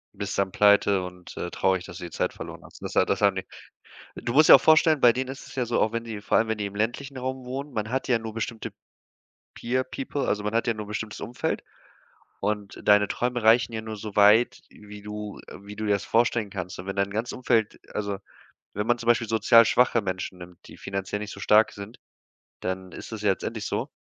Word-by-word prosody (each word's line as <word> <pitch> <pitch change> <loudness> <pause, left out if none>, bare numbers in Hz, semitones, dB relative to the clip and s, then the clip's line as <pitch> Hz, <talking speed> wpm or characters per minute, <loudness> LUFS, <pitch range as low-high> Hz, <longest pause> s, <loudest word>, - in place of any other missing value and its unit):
Bist 100 0 -4
dann 100 -1 +1
pleite 100 -2 +4
und, 90 -1 -10
äh, 90 - -3
traurig, 95 -1 0
dass 85 - -9
du - - -8
die 85 - -6
Zeit - - -1
verloren - - -9
hast. - - -15
Und - - -7
das - - -6
hat - - +2
das - - 0
haben 100 -2 +3
die 95 - -4 0.7
du 120 - -4
musst 155 +2 +6
dir - - +13
auch 135 - +4
vorstellen, 160 -1 +5
bei 120 -2 +6
denen 130 +1 -3
ist 135 +1 -8
es - - -12
ja 125 -2 0
so, 120 0 0
auch 110 - +2
wenn 115 0 -3
die 110 -3 -6
vor - - +2
allem, 115 0 +2
wenn 110 -1 -1
die 105 - -3
im 100 0 -7
ländlichen 120 +6 -2
Raum 130 0 -4
wohnen, 135 +3 -5
man 110 0 -3
hat 130 +2 -1
ja 125 - +3
nur 110 -1 -7
bestimmte 115 0 -4 0.8
Peer 130 +2 -1
People, 135 +2 -4
also, 105 0 0
man 105 - -2
hat 115 - +1
ja 115 - +1
nur 105 -1 -6
'n - - -14
bestimmtes 105 0 -5
Umfeld, 120 - -3 0.8
und 105 -1 -3
deine 105 -1 +5
Träume 125 -1 -2
reichen 115 +2 +4
ja 110 - -2
nur 110 -1 -6
so 105 -1 -8
weit, 105 +3 +5
wie 105 0 -12
du 105 0 -7
äh, - - -9
wie 105 +1 -10
du 110 0 -3
dir 105 - +2
das 100 - -2
vorstellen 115 -2 +1
kannst. 90 -2 -6
Und 90 - -8
wenn 95 - -4
dein 100 0 0
ganzes 110 +4 -3
Umfeld 115 -4 0
also, 100 -2 -2 0.6
wenn 105 +2 -2
man 120 - +3
zum 120 - -5
Beispiel 120 -1 +3
sozial-schwache 115 +2 +5
Menschen 95 -1 -4
nimmt, 90 -1 -12
die - - -13
finanziell 95 +1 -4
nicht 105 0 -6
so - - -10
stark 110 +1 +4
sind, 100 +4 -10 0.6
dann 95 0 -4
ist - - -9
das 110 -1 -6
ja 100 - +4
letztendlich 95 - -4
so - - -2
110 Hz, 240 wpm, -26 LUFS, 100-120 Hz, 0.8 s, dir